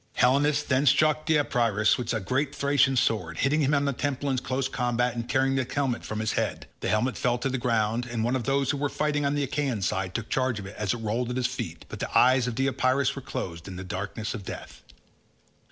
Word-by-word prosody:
Helenus 145 Hz, +4 st, +3 dB
then 135 Hz, +1 st, +1 dB
struck 155 Hz, +3 st, +3 dB
Deipyrus 120 Hz, -9 st, +2 dB
with 120 Hz, -2 st, -3 dB
a 110 Hz, -, 0 dB
great 130 Hz, +8 st, -1 dB
Thracian 140 Hz, -1 st, +3 dB
sword, 90 Hz, -9 st, 0 dB
hitting 150 Hz, +3 st, +2 dB
him 145 Hz, +1 st, +3 dB
on 140 Hz, 0 st, +1 dB
the 140 Hz, -, +1 dB
temple 140 Hz, +2 st, -2 dB
in 130 Hz, -, +1 dB
close 130 Hz, +1 st, -1 dB
combat 125 Hz, -1 st, 0 dB
and 115 Hz, 0 st, -5 dB
tearing 135 Hz, 0 st, +2 dB
the 135 Hz, -1 st, +1 dB
helmet 135 Hz, -4 st, -1 dB
from 110 Hz, 0 st, -4 dB
his 110 Hz, -, 0 dB
head; -, -, -2 dB
the -, -, -2 dB
helmet 120 Hz, +4 st, +1 dB
fell 120 Hz, -1 st, +1 dB
to 135 Hz, +2 st, -2 dB
the 130 Hz, 0 st, -2 dB
ground, 115 Hz, 0 st, 0 dB
and 120 Hz, -2 st, -2 dB
one 120 Hz, +3 st, +1 dB
of 125 Hz, -4 st, -2 dB
those 135 Hz, 0 st, +1 dB
who 145 Hz, -, -2 dB
were 145 Hz, +1 st, -1 dB
fighting 150 Hz, -1 st, 0 dB
on 140 Hz, -, 0 dB
the 145 Hz, -, 0 dB
Achaean 135 Hz, -6 st, -1 dB
side 95 Hz, 0 st, -1 dB
took 115 Hz, -2 st, -3 dB
charge 130 Hz, -3 st, 0 dB
of 100 Hz, -, -6 dB
it 100 Hz, -, -9 dB
as 105 Hz, 0 st, -1 dB
it 115 Hz, -, -7 dB
rolled 115 Hz, +3 st, -1 dB
at 125 Hz, -, -2 dB
his 130 Hz, -, 0 dB
feet, 90 Hz, -11 st, -4 dB
but -, -, -8 dB
the -, -, -1 dB
eyes 130 Hz, 0 st, +5 dB
of 120 Hz, -, -3 dB
Deipyrus 130 Hz, +1 st, +1 dB
were 135 Hz, -, -6 dB
closed 95 Hz, -11 st, -5 dB
in 95 Hz, -, -7 dB
the 90 Hz, -, -6 dB
darkness 100 Hz, +4 st, -4 dB
of 100 Hz, -, -6 dB
death. -, -, -8 dB
125 Hz, 240 wpm, -27 LUFS, 110-140 Hz, -, eyes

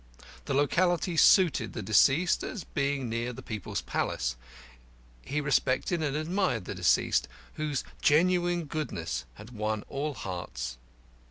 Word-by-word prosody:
The 140 Hz, -, -1 dB
locality 175 Hz, +5 st, +2 dB
suited 175 Hz, 0 st, +5 dB
the 115 Hz, -, -5 dB
deceased, 135 Hz, -, +4 dB
as 195 Hz, -, -5 dB
being 140 Hz, -2 st, -1 dB
near 115 Hz, +2 st, -2 dB
the -, -, -10 dB
People's 105 Hz, -4 st, -4 dB
Palace. -, -, -1 dB, 0.9 s
He 145 Hz, -, -2 dB
respected 145 Hz, +3 st, +1 dB
and 145 Hz, -2 st, -1 dB
admired 155 Hz, -, 0 dB
the -, -, -4 dB
deceased, -, -, +2 dB, 0.3 s
whose 150 Hz, -3 st, -2 dB, 0.2 s
genuine 175 Hz, +2 st, +3 dB
goodness 85 Hz, -, -4 dB
had 110 Hz, -, -12 dB
won 110 Hz, -2 st, -2 dB
all 145 Hz, +1 st, -3 dB
hearts. 60 Hz, -, -5 dB
140 Hz, 125 wpm, -29 LUFS, 110-165 Hz, 0.9 s, suited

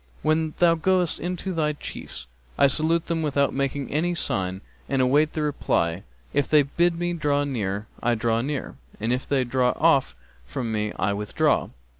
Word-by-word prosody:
'When 155 Hz, 0 st, +1 dB
thou 175 Hz, -1 st, +5 dB
goest 180 Hz, +1 st, +1 dB
in 180 Hz, +2 st, -2 dB
to 190 Hz, -, -1 dB
thy 155 Hz, -2 st, 0 dB
chiefs?' 145 Hz, -, -8 dB, 0.3 s
'I -, -, +6 dB
salute 160 Hz, +4 st, +1 dB
without 150 Hz, -4 st, +1 dB
making 140 Hz, 0 st, -2 dB
any 175 Hz, +4 st, 0 dB
sign 95 Hz, -, -2 dB, 0.3 s
and 135 Hz, -, +1 dB
await 145 Hz, +4 st, +3 dB
the 155 Hz, -, -1 dB
reply: 85 Hz, -, 0 dB, 0.3 s
if 145 Hz, -1 st, +1 dB
they 150 Hz, -1 st, +5 dB
bid 170 Hz, +5 st, +1 dB
me 175 Hz, 0 st, -1 dB
draw 145 Hz, -3 st, +1 dB
near, 105 Hz, -7 st, -2 dB, 0.2 s
I 120 Hz, 0 st, +2 dB
draw 115 Hz, 0 st, +1 dB
near, 140 Hz, +1 st, -4 dB, 0.2 s
and 115 Hz, +3 st, 0 dB
if 125 Hz, -, -3 dB
they 135 Hz, -2 st, +2 dB
draw 125 Hz, 0 st, +1 dB
off 140 Hz, -, +3 dB, 0.3 s
from 115 Hz, -, -4 dB
me 105 Hz, -1 st, -1 dB
I 100 Hz, +2 st, +1 dB
withdraw!' 105 Hz, +1 st, +1 dB
140 Hz, 175 wpm, -25 LUFS, 120-160 Hz, 0.3 s, I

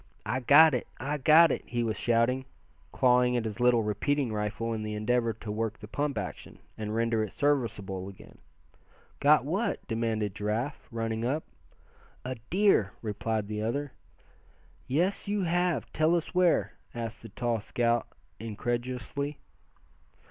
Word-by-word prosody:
"I 130 Hz, -, -1 dB
got 145 Hz, +4 st, +7 dB
it! 125 Hz, -, -1 dB
I 145 Hz, +4 st, -2 dB
got 155 Hz, +5 st, +7 dB
it!" -, -, -1 dB
he 120 Hz, -1 st, -1 dB
was 110 Hz, -2 st, -1 dB
shouting, 120 Hz, +3 st, +1 dB, 0.5 s
clawing 125 Hz, -1 st, +3 dB
at 115 Hz, -, -2 dB
his 110 Hz, +1 st, -4 dB
little 120 Hz, -2 st, +4 dB
repeating 120 Hz, +4 st, 0 dB
rifle 105 Hz, +2 st, -2 dB
in 110 Hz, -, -3 dB
the 105 Hz, 0 st, -4 dB
endeavor 115 Hz, +2 st, +1 dB
to 110 Hz, 0 st, -7 dB
work 110 Hz, 0 st, -2 dB
the 105 Hz, -, -10 dB
pump 145 Hz, +3 st, -2 dB
action, 95 Hz, -4 st, -6 dB, 0.2 s
and 110 Hz, 0 st, -4 dB
render 115 Hz, -1 st, +1 dB
it 105 Hz, -, -5 dB
serviceable 105 Hz, -10 st, -1 dB
again. 95 Hz, -, -15 dB, 0.8 s
"Got 145 Hz, -2 st, +5 dB
what?" 195 Hz, +10 st, -1 dB
demanded 110 Hz, -3 st, -1 dB
Giraffe, 110 Hz, +8 st, -3 dB
running 115 Hz, -1 st, -2 dB
up. 140 Hz, +6 st, 0 dB, 0.8 s
"A 130 Hz, -, -2 dB, 0.2 s
deer!" 185 Hz, -, +3 dB
replied 110 Hz, 0 st, -2 dB
the 105 Hz, 0 st, -3 dB
other. 140 Hz, +6 st, -2 dB, 1.0 s
"Yes, 175 Hz, +11 st, 0 dB
you 205 Hz, -1 st, 0 dB
have. 175 Hz, -4 st, 0 dB
Tell 155 Hz, +2 st, +3 dB
us 170 Hz, -, -2 dB
where?" 180 Hz, -2 st, +3 dB, 0.2 s
asked 115 Hz, -2 st, -5 dB
the 115 Hz, -, -10 dB
tall 115 Hz, +2 st, -1 dB
scout, 120 Hz, +2 st, 0 dB, 0.3 s
incredulously. 120 Hz, +6 st, -3 dB
120 Hz, 150 wpm, -29 LUFS, 110-145 Hz, 1.0 s, got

